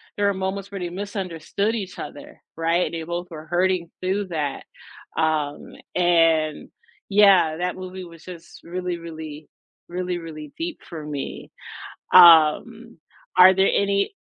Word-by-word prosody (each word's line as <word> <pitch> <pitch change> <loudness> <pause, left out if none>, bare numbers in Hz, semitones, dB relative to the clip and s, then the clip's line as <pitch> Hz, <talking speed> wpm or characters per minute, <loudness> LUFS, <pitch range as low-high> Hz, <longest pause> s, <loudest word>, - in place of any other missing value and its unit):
there 205 0 +2
are - - 0
moments 190 +1 -4
where 195 - -5
they 175 -1 -4
misunderstood 200 +2 -3
each 195 -4 -6
other, 290 +2 -9
right, 165 +2 +1
and - - -6
they 165 -1 -4
both 175 +2 -4
were 155 -1 -10
hurting 180 0 0
through 190 +2 -1
that. 150 -4 -3 0.5
Um, 155 -2 -1 0.2
and 165 -3 +2 0.4
yeah, 195 -6 +5
that 180 +1 -2
movie 185 0 -8
was 170 -1 -14
just 170 -2 -11
really, 180 0 -4
really, 160 -2 -9 0.4
really, 180 0 -3
really 155 -3 -9
deep 335 -1 -5
for 160 -3 -8
me. 145 -2 -6 0.6
Um, 180 +7 +6 0.4
are 185 +1 +9
there 190 +1 +3
any 200 - +1
175 Hz, 145 wpm, -23 LUFS, 160-195 Hz, 0.6 s, are